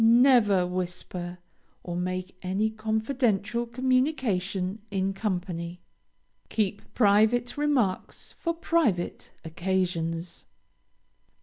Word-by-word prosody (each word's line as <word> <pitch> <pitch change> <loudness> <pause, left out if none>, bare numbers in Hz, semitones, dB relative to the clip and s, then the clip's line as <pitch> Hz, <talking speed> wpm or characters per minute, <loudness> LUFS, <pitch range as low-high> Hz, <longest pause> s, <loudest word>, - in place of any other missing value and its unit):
Never 230 -5 +6
whisper, 180 0 -4 0.5
or 175 - -4
make 185 +1 -3
any 195 +4 0
confidential 220 +1 0
communication 235 -7 0
in 195 -1 0
company. 180 -4 -3 0.7
Keep 205 -2 -2
private 220 +3 +4
remarks 280 -10 0
for 335 - -2
private 315 - 0
occasions. 170 -1 -2
200 Hz, 80 wpm, -27 LUFS, 180-235 Hz, 0.7 s, Never